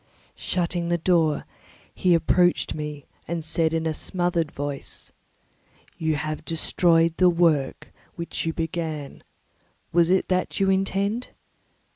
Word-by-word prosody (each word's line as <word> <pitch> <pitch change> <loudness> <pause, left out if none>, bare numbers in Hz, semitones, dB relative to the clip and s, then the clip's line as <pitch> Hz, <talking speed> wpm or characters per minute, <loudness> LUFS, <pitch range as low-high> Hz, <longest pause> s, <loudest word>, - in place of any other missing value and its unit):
Shutting 175 -1 -2
the 175 - +2
door, 165 -3 +2 0.5
he 180 -2 +3
approached 175 +1 +2
me 150 -2 -6 0.2
and 165 -1 -3
said 160 0 +1
in 165 0 -1
a 160 - 0
smothered 175 -1 -1
voice, 145 -1 -5 0.9
"You 160 -2 +1
have 155 +1 -3
destroyed 165 0 +2
the 180 -1 +6
work 165 -5 +1 0.2
which 170 -1 -4
you - - +1
began; 160 -3 -4 0.7
what 170 - +4
is 170 - +3
it 185 0 +3
that 185 +2 0
you 195 0 +3
intend? 195 +4 0
165 Hz, 130 wpm, -25 LUFS, 155-180 Hz, 0.9 s, the